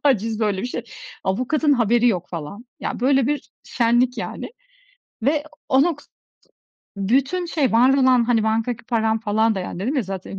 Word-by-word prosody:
haciz, 225 -5 +1
böyle 205 -3 0
bir - - -2
şey. 250 - -4 0.4
Avukatın 255 +10 +1
haberi 240 -1 +3
yok, 180 -6 -1
falan. 175 +7 -7 0.2
Ya, - - -4
böyle 270 0 +3
bir 290 -3 -2
şenlik, 240 +1 +1
yani. - - -5 0.7
Ve 290 +4 +1 0.3
o 265 +1 +5
nok 330 -3 -1 1.0
bütün 270 - 0
şey, 300 -7 0
var 250 +4 +5
olan, 255 -3 +4
hani, 230 -2 +2
bankadaki 225 +2 -1
param 225 -2 0
falan 220 0 +1
da, 190 - -3
yani, 180 - -6
dedim 260 +9 -1
ya 260 - +2
zaten. 195 0 -7
240 Hz, 170 wpm, -22 LUFS, 220-265 Hz, 1.0 s, o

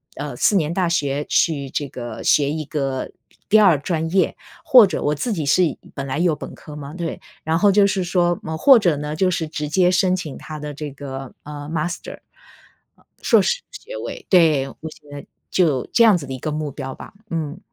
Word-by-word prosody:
呃， 145 -4 -5
四 200 - +2
年 160 -1 0
大 180 -2 0
学 145 -3 0
去 140 -5 +1
这 145 +1 -3
个 120 -3 -7
学 145 -1 +3
一 155 -1 -3
个 135 -3 -3 0.4
第 215 +1 +6
2 180 -9 +5
专 160 +1 -2
业。 190 0 +2 0.3
或 245 -5 +8
者 185 - -3
我 150 +1 0
自 225 - -2
己 160 -7 -2
是 180 +6 +4
一 150 - -3 0.2
本 140 - -4
来 135 +2 -3
有 170 -3 +2
本 - - -9
科 150 - -11
嘛， 145 0 -8
对， 170 -2 -4 0.3
然 160 +1 +1
后 205 +2 +4
就 200 0 +5
是 195 -2 -1
说 175 -1 +1
么 160 0 -4
或 270 - +7
者 175 -9 +2
呢 150 +1 -4
就 185 +2 +2
是 165 -2 -2
直 150 -1 -4
接 180 +2 +3
申 185 0 +2
请 155 -7 -6
它 155 -1 -8
的 150 0 -6
这 145 0 -6
个， 135 -1 -8
呃， 145 0 -8
master， 165 +2 -4 0.8
呃， - - -28 0.2
硕 - - +5
士 480 +1 0
学 - - -9
位， - - -7
对。 155 -7 +4
我 - - -13
现 145 -1 -17
在 145 0 -9 0.2
就 155 -9 +2
这 230 - +5
样 215 -5 +6
子 140 - -8
的 - - -5
一 - - -6
个 155 +4 -4
目 150 -1 -3
标 130 0 -6
吧， - - -11 0.2
嗯。 160 0 -3
155 Hz, 250 characters per minute, -21 LUFS, 145-180 Hz, 0.8 s, 或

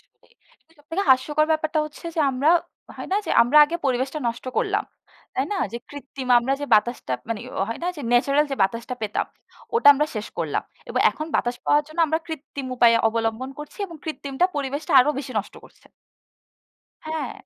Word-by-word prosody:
আসলেই। 480 - -30 0.3
তো - - -37
সবথেকে 325 +6 -3
হাস্যকর 295 +4 +3
ব্যাপারটা 315 0 +1
হচ্ছে 305 +2 -10
যে 320 - 0
আমরা 270 +5 +2 0.5
হয় - - -7
না? 395 - +3
যে - - -2
আমরা 250 +6 +1
আগে 330 +3 -3
পরিবেশটা 260 +3 -1
নষ্ট 235 - -6
করলাম। - - +1 0.5
তাই 265 +2 0
না? - - -1 0.2
যে 235 - -4
কৃত্রিম 275 -2 -8
আমরা 255 +3 -1
যে 290 - -3
বাতাসটা 215 - +1 0.2
মানে 225 -2 -2 0.2
অ - - +3
হয় 230 - -5
না? 355 - 0
যে - - -7
ন্যাচারাল 275 +4 +3
যে - - -2
বাতাসটা 230 +6 -1
পেতাম, 210 - -1 0.5
ওটা 460 -11 +6
আমরা 300 +2 +1
শেষ 215 0 -4
করলাম। - - -1 0.3
এবং - - 0
এখন 310 - -6
বাতাস 245 0 -1
পাওয়ার 295 0 +4
জন্য 315 +2 -13
আমরা 315 +1 0
কৃত্রিম 285 -4 -7
উপায়ে 235 -1 +6
অবলম্বন 225 +3 -2
করছি 295 +6 -10
এবং 335 - -11
কৃত্রিমটা 295 0 -1
পরিবেশটা 285 +1 -3
আরো 295 - +3
বেশি 275 -2 -6
নষ্ট 205 - -6
করছে। - - -20 1.2
হ্যাঁ, 315 -5 -3
275 Hz, 185 wpm, -23 LUFS, 245-310 Hz, 1.2 s, ওটা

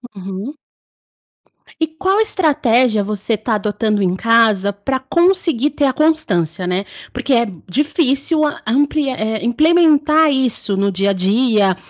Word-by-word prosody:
Uhum. 195 +8 -7 1.2
E 320 - 0
qual 380 +6 -1
estratégia 260 - +1
você 210 +2 -3
está 220 +1 -1
adotando 210 0 -1
em 185 -1 0
casa 220 -2 +2
para 260 +7 -3
conseguir 330 -2 +1
ter 290 0 0
a 265 - +1
constância, 195 - 0
né. 185 +2 -2 0.3
Porque 260 +2 -2
é 235 -1 +2 0.2
difícil, 295 - 0
hã, 300 +2 -3
amplia 280 +3 0
é, 220 -1 -3
implementar 310 +3 +3
isso 250 -6 -1
no 200 +1 0
dia 195 +2 0
a - - 0
dia, 200 +1 +2
245 Hz, 135 wpm, -17 LUFS, 205-300 Hz, 1.2 s, implementar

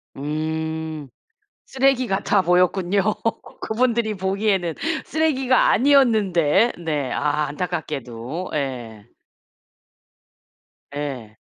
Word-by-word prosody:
음. 155 0 -4 0.6
쓰레기 265 -1 +2
같아 195 0 +1
보였군요 180 +2 +2 0.6
그분들이 230 -1 0
보기에는 190 -2 0 0.3
쓰레기가 270 -5 +2
아니었는데. 220 - +3
네. 145 -5 -1
아 150 0 0
안타깝게도. 150 -2 -5
예. 120 -7 -4 1.9
예. 130 -7 -5
175 Hz, 190 characters per minute, -22 LUFS, 145-220 Hz, 1.9 s, 아니었는데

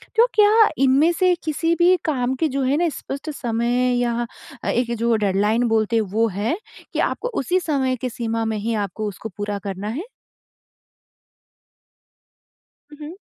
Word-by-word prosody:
तो 460 +2 +6
क्या 430 +1 +6
इनमें 275 +6 +4
से 365 -1 +4
किसी 330 +2 0
भी 355 +2 +5
काम 260 -4 0
के 315 +5 +1
जो 275 +1 -1
है 265 +3 +2
ना 345 +1 +2
स्पष्ट 280 0 -6
समय 245 0 0
या 240 0 0 0.4
एक 240 0 0
जो 230 +1 +2
डेडलाइन 210 +2 +1
बोलते 225 0 +1
हैं 225 - +4
वो 225 +2 +2
है, 215 - -2 0.4
कि - - -2
आपको - - 0
उसी 355 +8 +1
समय 275 -7 0
की 255 - -1
सीमा 230 -1 -2
में 220 -1 -1
ही 225 +3 -2
आपको 215 +4 -5
उसको 205 +2 -6
पूरा 205 0 -3
करना 195 +1 -5
है? 285 - -4 2.9
हुँ, 295 - -12
हुँ। 335 - -9
245 Hz, 160 wpm, -22 LUFS, 220-310 Hz, 2.9 s, तो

